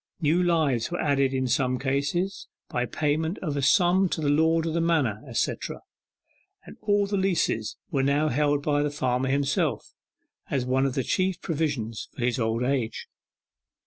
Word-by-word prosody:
New 160 +3 +2
lives 155 -9 +1
were 175 - -3
added 140 -3 +2
in 130 -1 -1
some 130 0 +1
cases, 140 +9 -1 0.2
by 125 0 -1
payment 155 - -1
of 150 -5 -2
a 140 - -1
sum 180 +5 +4
to - - -2
the 150 -2 0
lord 160 +2 +3
of 165 - -2
the 170 - +1
manor, 150 -11 +1
etc., - - -2 0.9
and - - -11
all 205 -1 +2
the 200 0 -1
leases 180 - 0
were 140 -4 +1
now 140 +3 +2
held 145 +1 +1
by 145 -1 +1
the 150 - 0
farmer 130 -2 -1
himself, 140 0 0 0.6
as 130 -3 -1
one 130 +2 +2
of 130 - -4
the 135 - 0
chief 185 +3 0
provisions 140 -9 -3
for 120 - -2
his 125 +1 0
old 115 +1 0
age. 125 -4 -1
145 Hz, 175 wpm, -26 LUFS, 130-165 Hz, 0.9 s, sum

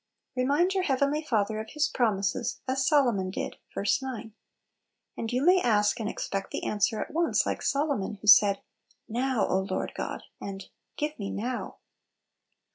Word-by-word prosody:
Remind 285 +9 +2
your 385 - +1
heavenly 280 +2 +1
Father 215 -7 0
of 220 - -7
His 300 -1 +2
promises, 200 -5 0
as 265 +1 0
Solomon 240 - +3
did 185 - -4
(ver. - - -4 0.2
9). 240 -4 -6 0.8
And 225 0 -4
you 255 +4 0
may 365 +1 +6
ask 210 -1 +2
and 215 -2 -2
expect 195 -3 -3
the - - -4
answer 210 +1 +1
at - - -4
once, 335 +1 +2
like - - -2
Solomon, 275 -8 0
who 205 - -13
said, 205 -1 +7 0.5
"Now, 245 -1 0
O - - +2
Lord 190 - -2
God! - - -4
" - - -44
and 195 -1 -6
" - - -53
Give 300 -2 -3
me 200 -1 -3
now 245 +4 -4
235 Hz, 170 wpm, -28 LUFS, 205-280 Hz, 0.8 s, said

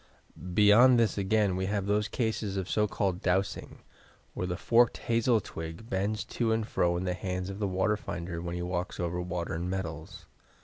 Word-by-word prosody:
Beyond 115 +4 +7
this 115 -2 +2
again 100 -1 +1
we 95 0 -1
have 100 -1 -1
those 105 +1 +1
cases 110 -4 -2
of 95 -2 -2
so 105 +1 +1
called 95 -3 -1
"dowsing," 95 +1 -1 0.5
where 90 - -3
the 90 -1 -3
forked 120 +3 +3
ha/.el 115 0 +3
twig 80 +4 -8
bends 100 +3 -1
to 115 -2 -1
and 110 -1 0
fro 85 -4 +1
in 90 - -2
the 90 -1 -1
hands 90 0 -4
of 100 - -8
the 105 - 0
water 95 +3 +1
finder 85 -3 -5
when 85 0 -4
he 90 - -3
walks 90 0 -3
over 90 0 -2
water 90 -1 -3
and 85 +3 -3
metals. 80 -5 -5
95 Hz, 190 wpm, -29 LUFS, 90-105 Hz, 0.5 s, Beyond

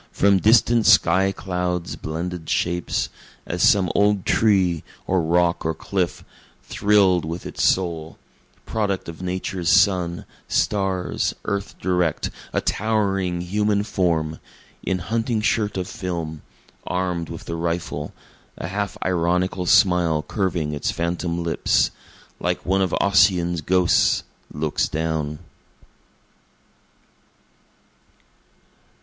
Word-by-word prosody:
from 100 -1 +3
distant 115 +2 +4
sky 95 0 +5
clouds' 90 -2 -3
blended 85 +1 -5
shapes, 85 0 -1 0.4
As 90 0 -3
some 95 -4 +4
old 100 -1 +2
tree, 95 -7 +2 0.2
or 95 -1 +1
rock 85 +1 +1
or 80 0 -1
cliff, 90 0 -2 0.4
thrill'd 95 +3 +3
with 85 +3 -5
its - - -3
soul, 85 -4 0 0.5
Product 100 -4 -2
of 85 +1 -8
Nature's 90 -1 -2
sun, 90 -4 +3 0.2
stars, 95 -3 0
earth 100 0 -3
direct 90 -3 0 0.2
a - - 0
towering 95 -5 0
human 105 +3 0
form, 85 -6 -1 0.4
In 95 - -1
hunting 115 +5 -1
shirt 105 -1 0
of 90 -1 -3
film, 85 -4 -5 0.5
arm'd 90 -2 -2
with 85 - -8
the - - -5
rifle, 85 -3 -3 0.5
a 85 - -5
half 100 +1 -3
ironical 90 +1 0
smile 85 -5 +4
curving 85 -7 -2
its 70 - -2
phantom 85 0 -2
lips, 85 - +1 0.5
Like - - -2
one 95 +1 +2
of 95 -3 0
Ossian's 90 -4 +3
ghosts 90 +2 +3 0.3
looks 75 0 -1
down. 80 -1 -2
90 Hz, 110 wpm, -22 LUFS, 85-95 Hz, 0.5 s, sky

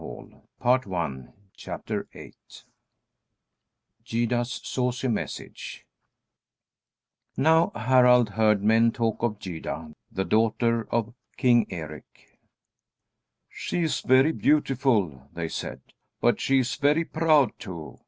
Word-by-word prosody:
Gyda's 120 +1 -1
Saucy 125 0 -1
Message 115 -4 -5 1.5
Now 160 +4 +4
Harald 125 0 +4
heard 105 -1 +2
men 115 +2 +4
talk 115 -2 -2
of 115 -3 -1
Gyda, 80 -4 -6 0.2
the 95 - -2
daughter 115 +1 +1
of 115 0 -1 0.2
King 120 -3 +4
Eric. 80 -4 -10 1.1
"She 175 - -3
is 160 - -1
very 130 +4 +4
beautiful," 120 - +1
they 85 -1 -3
said, - - -6 0.4
"but - - +2
she 135 - +2
is 130 -1 +1
very 150 +3 +2
proud, 155 -5 +2
too. 85 -5 -8
120 Hz, 90 wpm, -26 LUFS, 105-130 Hz, 1.5 s, Now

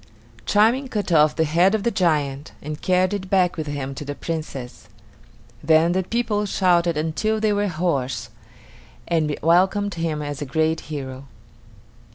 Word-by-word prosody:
Charming 235 +6 +3
cut 210 -6 -3
off 150 -2 +4
the 160 - +2
head 170 +6 +3
of 210 - -2
the 235 - +1
giant, 150 -7 0
and 150 +1 -7
carried 185 +1 +2
it 190 -2 -4
back 185 -2 +2
with 155 -2 -4
him 140 -2 -4
to 135 - -7
the 145 0 -5
Princess. 135 -10 -6 0.8
Then 160 +2 +4
the 185 +1 +1
people 210 0 -1
shouted 175 -4 +2
until 165 +8 -1
they 215 -1 +2
were 205 0 0
hoarse, 140 -9 -2 0.8
and 155 -3 0
welcomed 190 +5 +3
him 165 -3 -2
as 145 0 -5
a - - -2
great 160 +3 +1
hero. 135 -3 -6
165 Hz, 160 wpm, -22 LUFS, 150-195 Hz, 0.8 s, off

